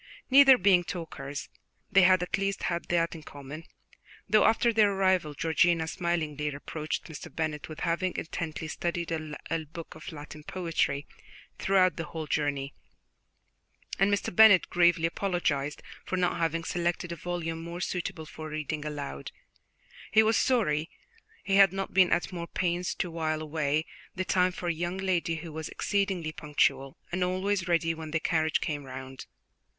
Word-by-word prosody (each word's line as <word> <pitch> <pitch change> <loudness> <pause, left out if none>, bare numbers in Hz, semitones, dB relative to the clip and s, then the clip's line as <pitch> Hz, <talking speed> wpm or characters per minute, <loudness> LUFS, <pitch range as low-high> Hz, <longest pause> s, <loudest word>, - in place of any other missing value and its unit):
Neither 270 -1 +9
being 185 -3 +4
talkers, 145 -5 -6 0.4
they 195 - +6
had 185 -1 +5
at 180 - -1
least 195 0 -1
had 170 -1 -1
that 170 -1 +1
in 165 - -8
common, 145 +2 -9 0.6
though 215 -1 +5
after 230 +1 +3
their 210 -2 +4
arrival 185 -6 +1
Georgiana 165 +1 +2
smilingly 155 -4 -1
reproached 150 +2 -4
Mr. 160 -3 -9
Bennet 155 -2 -3
with 155 - -8
having 175 +1 0
intently 160 -1 -4
studied 170 +1 -3
a 155 0 -4
book 165 +2 -9
of 155 - -9
Latin 150 0 -10
poetry 165 -5 -1 0.5
throughout 185 -4 +3
the 165 - -3
whole 160 +1 -6
journey, 145 -2 -1 1.3
and 195 +2 +4
Mr. 200 -3 -1
Bennet 220 -3 +7
gravely 175 -1 +4
apologized 165 -5 -1 0.2
for 185 - -3
not 180 -1 +1
having 165 0 0
selected 175 0 -2
a - - -3
volume 165 -1 -4
more 170 +1 -6
suitable 180 -2 -3
for 155 0 -8
reading 155 0 -4
aloud; 145 - -5 0.8
he 220 +1 +6
was 220 +1 +3
sorry 175 - +2 0.5
he 195 -1 +2
had 195 -3 +7
not 195 0 -4
been 185 -2 +5
at 175 - 0
more 170 -1 -5
pains 180 0 -1
to 175 - -3
while 160 -1 -1
away 155 0 0 0.3
the 185 0 -2
time 180 0 +3
for 180 0 -6
a 170 - +2
young 175 +3 -3
lady 185 -3 0
who 160 +1 -7
was 160 0 -5
exceedingly 195 -6 -1
punctual, 140 -3 0
and 180 +1 0
always 185 +1 0
ready 165 -1 +2
when 160 -1 -7
the 160 +1 0
carriage 160 -1 +1
came 145 -2 -3
round. 130 0 -8
170 Hz, 160 wpm, -29 LUFS, 155-185 Hz, 1.3 s, Neither